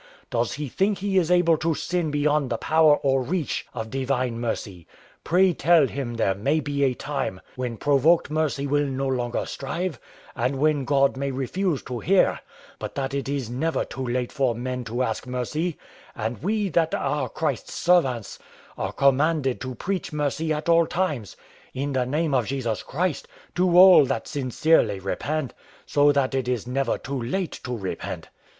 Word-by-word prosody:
Does 120 -2 0
he 150 0 -4
think 195 - 0
he 195 0 +1
is 170 -2 -1
able 175 -2 +4
to 160 +1 0
sin 175 -1 -1
beyond 145 -1 +1
the 115 - -1
power 155 +1 +4
or 135 -1 +1
reach 160 +3 -2
of 110 -2 -6
divine 130 -3 -1
mercy? 100 -7 -4 0.4
Pray 180 +2 +3
tell 165 -1 +4
him 130 -3 -4
there 105 -4 +1
may 135 +11 0
be 145 -2 -1
a 130 -2 +2
time 135 -11 -3 0.2
when 125 -2 -4
provoked 145 +5 +3
mercy 155 -3 0
will 145 +1 +1
no 135 0 -2
longer 125 -2 -1
strive, 155 +1 -4 0.4
and 125 +4 0
when 145 -1 +2
God 140 0 +2
may 140 +1 -1
refuse 140 +5 -1
to 125 -2 -5
hear, 190 - +3 0.4
but - - -6
that 135 -1 -2
it 140 -1 -2
is 140 -4 -2
never 140 +8 -1
too 130 - -6
late 125 0 -2
for 130 -5 0
men 125 +1 -4
to 120 +3 -1
ask 115 +1 -3
mercy; 150 +7 -2 0.4
and 110 +2 -4
we, 210 +3 0
that 165 -1 +1
are 140 -2 -1
Christ's 155 +7 -3
servants, 135 - +1 0.4
are 95 - -2
commanded 140 +1 +2
to 130 -1 -5
preach 190 - -3
mercy 150 +1 -1
at 150 +1 -2
all 170 -1 +5
times, 150 - -2 0.4
in 140 +2 -2
the 125 -2 0
name 150 +2 0
of 125 -5 +2
Jesus 120 -6 -2
Christ, 170 +2 -2 0.3
to 180 -1 +2
all 185 0 +10
those 140 - +4
that 115 -5 -2
sincerely 130 -6 +2
repent: 135 +9 -3 0.3
so 145 0 +4
that 140 -2 +1
it 130 -2 -1
is 125 -4 -1
never 135 +2 0
too 135 -1 -5
late 170 +9 -3
to 125 -2 -3
repent." 95 -3 -5
140 Hz, 180 wpm, -24 LUFS, 125-160 Hz, 0.4 s, all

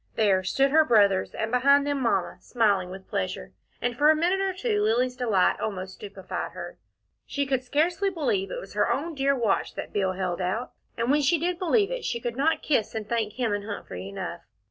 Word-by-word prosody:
There 200 -4 +3
stood 270 +8 +2
her 315 +2 +6
brothers, 200 -7 +3
and 220 0 -2
behind 280 +3 +4
them 285 -1 -1
Mamma, 235 - 0
smiling 205 -6 +1
with 190 +1 -10
pleasure, - - -3 0.3
and 245 -1 -1
for 295 +4 +4
a 315 - +6
minute 355 +5 +1
or 390 0 +1
two 415 +2 -1
Lilly's 255 - +1
delight 225 -7 +2
almost 190 -3 -4
stupefied 200 -2 -6
her. - - -8 0.5
She 280 0 -1
could 265 -2 0
scarcely 335 +9 +1
believe 385 +3 -1
it - - -4
was - - -10
her - - +1
own 325 +4 -2
dear 275 -1 +1
watch 230 -6 0
that - - -6
Bill 190 -2 +1
held 185 -1 -2
out, 195 +7 -2 0.3
and 235 +2 +1
when 295 +1 +3
she 290 +5 +3
did 345 +2 -2
believe 400 +5 +2
it, - - -3
she 235 - -2
could 235 0 -4
not 300 +5 +1
kiss 235 -7 0
and 215 -2 -4
thank 225 -3 -1
him 235 -3 -1
and 205 0 -3
Humphrey 200 -2 -6
enough. 185 -3 -6
250 Hz, 210 wpm, -26 LUFS, 205-310 Hz, 0.5 s, her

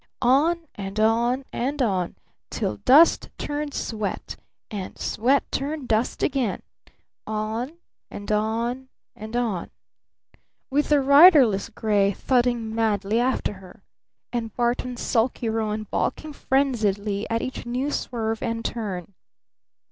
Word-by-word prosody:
On 315 +7 +3
and 195 +1 -5
on 235 +4 +2
and 275 +4 -2
on! 190 -8 0 0.3
Till 105 - -2
dust 295 - +5
turned 290 0 -4
sweat! 215 -3 -4 0.4
And 200 -3 -6
sweat 260 +5 +1
turned 285 -1 -3
dust 220 +2 0
again! 255 -8 0 0.6
On 220 +6 -3 0.4
and 205 +1 -6
on 230 +5 -1 0.3
and 220 +2 -8
on! 225 -8 -1 1.0
With 290 +2 +1
the 295 -2 +4
riderless 280 - +6
gray 205 -2 +1
thudding 240 -1 0
madly 220 -1 +1
after 250 -3 0
her! 185 -2 -15 0.5
And 230 -2 -2
Barton's 245 0 -1
sulky 235 0 0
roan 215 -1 -1
balking 300 +8 -3
frenziedly 215 -8 0
at 230 0 -1
each 255 -2 -5
new 255 +4 -1
swerve 225 -5 -2
and 230 -1 -3
turn! 200 -5 -4
230 Hz, 120 wpm, -24 LUFS, 215-265 Hz, 1.0 s, riderless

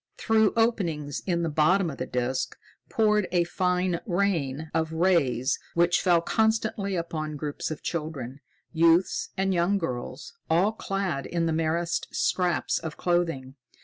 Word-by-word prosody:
Through 220 -2 +3
openings 170 - 0
in 170 -2 +1
the 165 - 0
bottom 165 +4 +2
of 135 - -10
the 130 - -3
disc 125 +1 -2 0.3
poured 210 -3 +2
a 175 -1 +3
fine 180 0 0
rain 160 -6 -1
of 160 0 0
rays 150 -7 +2 0.2
which 170 0 +3
fell 175 -2 +4
constantly 220 -1 0
upon 155 -3 -3
groups 145 0 -4
of 155 - -6
children, 145 -5 -4 0.3
youths 165 +2 +3
and 190 0 +1
young 180 +3 +2
girls, 130 -4 -5 0.2
all 175 +6 +3
clad 195 -10 -3
in 170 -1 -1
the 165 - 0
merest 165 +2 -1
scraps 180 -3 +1
of 160 -2 -7
clothing. 165 -7 -1
170 Hz, 145 wpm, -26 LUFS, 155-185 Hz, 0.3 s, fell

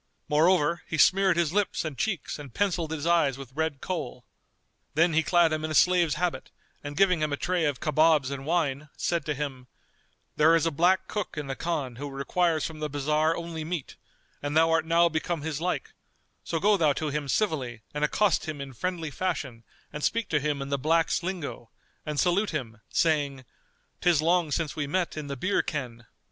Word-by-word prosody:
Moreover, 165 +2 +3
he 160 - -3
smeared 190 0 +4
his 170 -2 +1
lips 205 -4 0
and 155 -3 -4
cheeks 180 - -2
and 140 -3 -9
pencilled 180 -5 0
his 160 -1 -4
eyes 165 -6 +3
with 135 -2 -10
red 160 -2 -2
Kohl.[FN#235] 165 -8 -4 0.7
Then 165 +2 +4
he 160 - +4
clad 170 -1 +3
him 155 0 -2
in 155 - -2
a 155 - -2
slave's 175 -3 +4
habit 175 -7 -2 0.3
and 145 0 -6
giving 185 -4 +4
him 155 -1 0
a 145 - -1
tray 180 0 0
of 145 -3 -1
kabobs 155 -2 +3
and 135 -1 -5
wine, 150 -2 -1
said 170 -4 -1
to 150 - 0
him, 130 -3 -5 0.7
"There 160 +2 +6
is 165 - +2
a 165 - +1
black 175 +5 +2
cook 210 -6 -4
in 150 - -3
the 135 -1 -4
Khan 145 -8 -3
who 145 +2 -5
requires 160 +4 0
from 160 -1 -6
the 150 0 -2
bazar 150 +3 +1
only 165 -2 -5
meat; 160 -3 -5 0.5
and 145 +2 -1
thou 165 0 +5
art 165 0 +2
now 170 +1 +5
become 160 -1 -2
his 155 -1 -3
like; 180 +1 -2 0.5
so 165 - -2
go 205 +4 +4
thou 155 -5 +3
to 155 +2 -2
him 145 0 -3
civilly 130 - -1
and 150 0 -2
accost 195 +5 +2
him 155 -2 -4
in 135 -1 -7
friendly 170 +2 -3
fashion 140 -9 -3 0.3
and 150 - -5
speak 230 0 0
to 150 - +2
him 145 -1 -1
in 135 - -7
the 140 -1 0
blacks' 165 +5 +2
lingo, 170 -10 -5 0.4
and 150 -1 -2
salute 185 +4 +2
him, 115 -8 -5
saying, 145 -5 +1 0.6
'Tis 175 -4 +4
long 170 +1 +2
since 155 0 -1
we 145 -2 -2
met 175 +4 -1
in 155 -2 -5
the 140 -1 -5
beer 185 +10 +1
ken. 120 -6 -5
155 Hz, 205 wpm, -27 LUFS, 145-170 Hz, 0.7 s, There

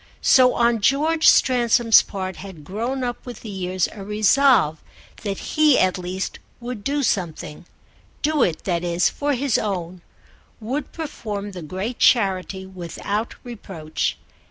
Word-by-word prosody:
So 255 -1 +5
on 235 -2 +2
George 310 +7 +2
Stransom's 240 -2 +5
part 190 -2 -6
had 185 -6 -10
grown 235 - -3
up 245 -1 -4
with 245 -1 -9
the 220 - -8
years 185 -1 -1
a 200 - -9
resolve 210 - +3 0.4
that 200 -3 -3 0.2
he 305 -3 +5
at 185 0 +2
least 180 +2 -4 0.2
would 240 -3 -6
do 285 +4 -1
something, 175 - -3 0.6
do 305 -1 +1
it, 165 -8 +1
that 175 -2 -1
is, 175 0 +2
for 290 0 -1
his 265 0 +1
own—would 205 - -6
perform 210 -10 -5
the 185 -2 -8
great 190 +9 -5
charity 190 -4 +2
without 190 +4 -4
reproach. 190 -10 -4
205 Hz, 135 wpm, -22 LUFS, 185-250 Hz, 0.6 s, So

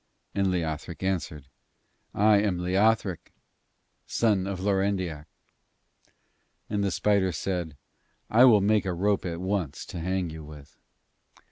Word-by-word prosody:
And 100 -1 +1
Leothric 85 -2 -3
answered: 85 -7 -2 0.7
'I 105 +1 +5
am 100 -4 0
Leothric, 95 0 +1 0.8
son 105 -5 +1
of 100 -2 -4
Lorendiac.' 95 -5 -1 1.4
And 105 -1 0
the 100 - +1
spider 95 +1 +1
said: 85 -2 -3 0.5
'I 120 +4 +7
will 110 -5 +6
make 105 +1 +2
a 90 - -1
rope 100 +3 0
at 85 -1 -4
once 95 -6 -2
to 85 - -7
hang 90 0 -2
you 80 0 -8
with.' 75 -1 -13
95 Hz, 125 wpm, -27 LUFS, 85-100 Hz, 1.4 s, I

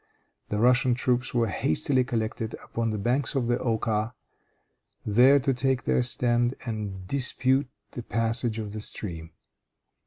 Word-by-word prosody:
The 105 - -2
Russian 125 +1 +3
troops 125 0 0
were 120 -2 +1
hastily 130 - +1
collected 115 -2 -3
upon 115 -1 -3
the 110 - -2
banks 125 +8 -1
of 130 -3 +1
the 120 +1 0
Oka, 110 0 -1 0.9
there 125 +7 +5
to 135 0 0
take 130 0 0
their - - +1
stand 120 0 +2
and 105 -5 -5
dispute 135 +1 +1 0.2
the 120 - -6
passage 115 0 -1
of 105 -2 -5
the 110 - -5
stream. 85 -6 -5
120 Hz, 145 wpm, -26 LUFS, 110-125 Hz, 0.9 s, there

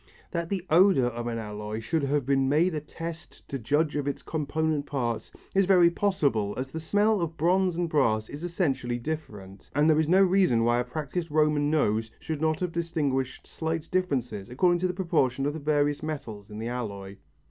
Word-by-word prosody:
That 170 -1 -2
the 190 -3 -2
odour 175 -5 +5
of 120 0 -3
an 115 -1 -2
alloy 105 0 -5
should 155 +8 -1
have 140 -1 0
been 135 0 +2
made 165 +5 +3
a 155 - -1
test 165 +2 -8
to 135 - -3
judge 145 +6 +1
of 145 -1 -1
its 140 - -3
component 155 -1 -1
parts 120 -5 -2 0.2
is 195 0 +4
very 180 -3 +6
possible 145 - 0
as 130 +1 -4
the 160 - -4
smell 205 +5 +2
of 165 -1 -3
bronze 180 +2 +2
and 175 0 0
brass 115 -9 +1
is 145 +3 -8
essentially 135 -9 -1
different, 115 -9 -7
and 145 +2 +4
there 155 -1 +4
is 160 -1 +1
no 190 +2 +6
reason 180 -11 +3
why 120 +1 +3
a - - +1
practised 160 +5 -4
Roman 150 -1 +2
nose 110 -8 +1
should 155 -2 -4
not 160 +1 +1
have 180 -1 -1
distinguished 145 -6 -2
slight 160 0 -4
differences 125 - -1
according 175 +8 +2
to 185 - +1
the 180 - -3
proportion 135 -8 +1
of 145 - 0
the 160 - -5
various 145 -1 +1
metals 115 -10 -6
in 105 - -8
the 115 +1 -4
alloy. 100 -5 -5
150 Hz, 200 wpm, -27 LUFS, 125-170 Hz, 0.2 s, very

